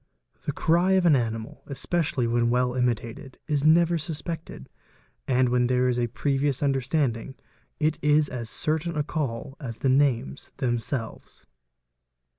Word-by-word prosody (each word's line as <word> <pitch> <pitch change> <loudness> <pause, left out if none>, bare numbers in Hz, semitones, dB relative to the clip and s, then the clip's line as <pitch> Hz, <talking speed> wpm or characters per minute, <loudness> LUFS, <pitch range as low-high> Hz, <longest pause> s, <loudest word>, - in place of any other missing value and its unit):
The - - 0
cry 175 +4 +2
of 190 -2 +3
an 160 -4 +6
animal, 115 -3 -3
especially 140 -1 -1
whe 120 +1 +1
well 125 +1 +1
imitated, 125 +1 -2
is 145 -2 0
never 170 +2 +4
suspected, 160 - -6 0.6
and 125 -1 +3
when 125 0 +2
there 125 0 +2
is 125 -1 +1
a 120 - +1
previous 140 +3 0
unde 135 -2 +1
standing 135 -2 -1 0.4
it 155 0 +1
is 150 0 +4
as 120 -4 -5
certain 160 +4 -1
a 150 - +1
call 140 -3 -4
as 120 -6 -6
the 130 +3 0
names 130 - +1
themselves. 120 -1 -3
135 Hz, 145 wpm, -26 LUFS, 120-155 Hz, 0.6 s, an